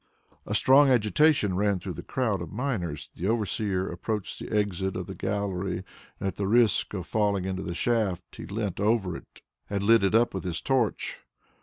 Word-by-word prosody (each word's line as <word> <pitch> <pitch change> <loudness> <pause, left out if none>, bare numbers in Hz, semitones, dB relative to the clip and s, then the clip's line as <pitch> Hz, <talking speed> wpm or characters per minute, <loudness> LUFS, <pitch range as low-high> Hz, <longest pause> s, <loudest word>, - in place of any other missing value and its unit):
A - - -1
strong 135 +2 +6
agitation 125 - +3
ran 100 0 +2
through 90 - -6
the - - -7
crowd 110 -8 -1
of 85 - -6
miners. 90 - -3
The 90 - -3
overseer 105 -3 0
approached 105 +4 -4
the - - -7
exit 100 -3 0
of - - -3
the - - -7
gallery, 95 -3 -2 0.4
and - - -4
at 95 - -4
the 100 - -1
risk 115 -1 +3
of 90 -2 -4
falling 100 -3 0
into 95 0 -2
the 85 -3 -4
shaft, 110 -5 -1
he - - -7
leant 100 -2 -3
over 105 -4 +1 0.5
and 100 -1 -1
lit 115 +1 +5
it 100 +2 +2
up 120 +1 +4
with 95 - -4
his 85 -3 -2
torch. 125 -6 0
100 Hz, 185 wpm, -27 LUFS, 95-115 Hz, 0.5 s, strong